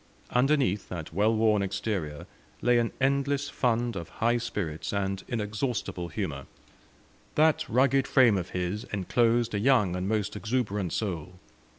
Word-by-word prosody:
Underneath 125 -6 +2
that 80 -3 -6
well 105 +5 +2
worn 110 -2 +3
exterior 95 -6 -3 0.4
lay 120 -1 +4
an 115 -1 0
endless 140 +1 +1
fund 120 -2 0
of 85 -3 -6
high 120 +2 +1
spirits 100 -10 -4
and 95 -1 -2
inexhaustible 105 -4 -2
humour; 85 - -4 0.9
that 155 0 +3
rugged 135 +2 +3
frame 125 -6 +5
of 90 -2 -3
his 90 +4 -3
enclosed 115 +4 +1
a 100 - 0
young 105 -6 +3
and 90 +2 -2
most 105 -2 -1
exuberant 105 -4 -1
soul. 90 -5 -3
110 Hz, 135 wpm, -28 LUFS, 95-120 Hz, 0.9 s, frame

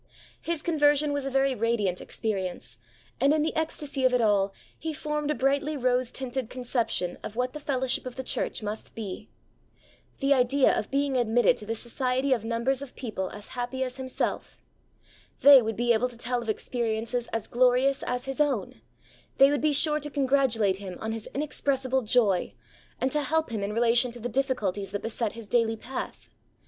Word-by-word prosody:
His 335 -2 -3
conversion 295 -2 +3
was 285 -1 -2
a - - -1
very 270 0 +2
radiant 220 -6 0
experience, 185 - -4 0.4
and, 275 +3 +4
in 305 - +2
the 315 - -1
ecstasy 295 -3 -2
of 255 -1 +4
it - - +3
all, 205 -3 +3 0.3
he 320 0 -3
formed 300 -1 -2
a 300 - +1
brightly 280 +3 +1
rose 250 -1 +1
tinted 260 -2 -4
conception 235 -8 -1
of 215 - -7
what 250 +1 -1
the 300 - -6
fellowship 260 -3 -1
of 250 - -7
the 260 - -4
church 240 - -2
must 210 +1 -5
be. 205 -5 -6 0.9
The 275 +1 +4
idea 260 +1 +3
of - - -2
being 275 -1 +1
admitted 240 +1 +3
to 210 - -10
the 225 - -1
society 255 +3 0
of 235 -4 -1
numbers 235 +4 0
of 280 -3 -9
people 210 -7 -4
as 205 - -10
happy 250 +1 -3
as 255 0 -5
himself! 260 -1 -3 0.8
They 280 -2 +9
would 220 -1 -2
be 240 +2 +2
able 240 +3 +1
to 240 - -11
tell 245 +1 -2
of 230 - -6
experiences 230 +1 -2
as 225 -2 -2
glorious 255 +3 +3
as 250 0 -3
his 270 +2 -2
own; 270 -10 -1 0.6
they 275 +1 +7
would 290 - 0
be 305 0 +3
sure 300 +1 +3
to 295 0 -4
congratulate 260 -8 +2
him 190 -2 -7
on 220 - -3
his 225 -1 -6
inexpressible 270 -2 0
joy, 215 -5 +2 0.4
and 260 - 0
to 300 - +1
help 315 0 0
him 220 -3 -2
in 200 +1 -2
relation 235 +2 +3
to 240 - -8
the 240 +2 -4
difficulties 215 -7 -1
that 205 - -3
beset 225 -1 -1
his 230 -1 -9
daily 225 -1 +2
path. 255 +4 -7
250 Hz, 190 wpm, -27 LUFS, 225-275 Hz, 0.9 s, They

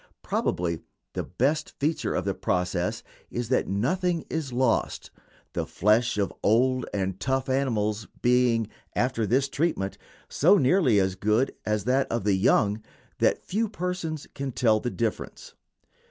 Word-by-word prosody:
Probably 85 -1 -1 0.3
the - - -2
best 150 +5 -1
feature 150 +1 0
of 90 - -1
the 100 - 0
process 90 -1 -1 0.3
is 120 -1 -4
that 130 - +2
nothing 165 - 0
is 155 -5 -2
lost, 125 -1 0 0.4
the - - -2
flesh 110 +4 +2
of 100 -2 0
old 125 +4 +2
and 95 -1 -2
tough 130 +4 0
animals 110 -6 0 0.2
being, 120 -2 +3 0.3
after 120 -3 0
this 135 +6 +2
treatment, 140 -10 -1 0.3
so 185 +8 +4
nearly 135 - +4
as 95 -1 +1
good 105 +7 +1
as 105 -2 0
that 130 +4 +1
of 115 -3 -1
the 100 0 +2
young 100 +2 +2 0.4
that - - +2
few 220 +3 -1
persons 180 -6 -3
can 135 -1 -4
tell 110 -3 +3
the 120 - -2
difference. 115 -3 -4
120 Hz, 145 wpm, -26 LUFS, 105-140 Hz, 0.4 s, so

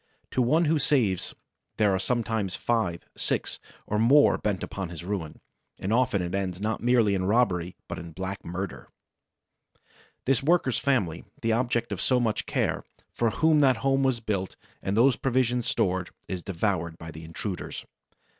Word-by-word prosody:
To 130 - +1
one 155 +8 +3
who 155 0 +2
saves 125 - +1 0.4
there 105 -3 +3
are 95 - +1
sometimes 110 -3 -1
five, 110 -8 0
six - - -2 0.3
or 105 - -1
more 135 +6 +5
bent 100 -3 -1
upon 95 -3 -4
his 85 0 -8
ruin; 90 -6 -4 0.4
and 100 +4 -2
often 120 -6 +2
it 90 +1 -4
ends 95 -2 -2
not 110 +1 -2
merely 120 -4 +4
in 95 -1 0
robbery 95 -5 +2
but - - -5
in 85 0 -8
black 95 +3 -5
murder! 90 +2 -5 1.4
The 135 -2 +2
worker's 135 -7 +2
family, 100 - 0 0.2
the 115 - +2
object 120 0 0
of - - -2
so 130 -1 +3
much 115 -3 0
care, - - 0 0.3
for 115 - +1
whom 155 +7 +3
that 130 -4 +5
home 135 0 +3
was 130 -3 +1
built 100 -4 -2 0.3
and 100 +2 -1
those 125 +2 +5
provisions 125 -2 +1
stored, 90 -1 0 0.2
is 95 -2 -4
devoured 85 -3 -1
by 80 -1 -8
the 80 +1 -10
intruders. 90 +4 -5
105 Hz, 165 wpm, -27 LUFS, 95-125 Hz, 1.4 s, more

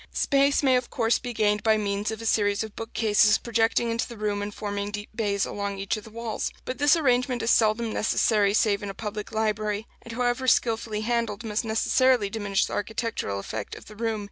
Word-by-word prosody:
Space 280 0 +2
may 260 -2 +4
of 250 - -3
course 230 -1 +1
be 245 - -5
gained 210 -2 +1
by 220 -1 +3
means 205 0 -1
of 220 0 -5
a - - -6
series 205 -1 +2
of 220 -2 -9
bookcases 215 -2 +3
projecting 230 0 +1
into 230 0 -1
the 235 - -10
room 205 -1 -1
and 205 +1 -4
forming 205 -1 -4
deep 205 0 -7
bays 205 -3 0
along 200 -1 -4
each 195 +2 -1
of 215 - -7
the - - -11
walls; 230 0 -4
but 255 - -5
this 290 +2 +5
arrangement 250 -5 +1
is 230 - +2
seldom 220 0 +2
necessary 210 -2 +2
save 205 -2 +2
in 205 - -5
a 195 - -7
public 210 0 -5
library, 215 -1 -1 0.2
and 230 - -9
however 245 +2 0
skilfully 225 -3 +1
handled 230 -1 -1
must 215 0 -2
necessarily 225 0 +2
diminish 205 -3 0
the - - -7
architectural 220 - -3
effect 110 +3 -5
of - - -12
the 210 - -12
room. 225 0 -2
220 Hz, 210 wpm, -26 LUFS, 205-235 Hz, 0.2 s, this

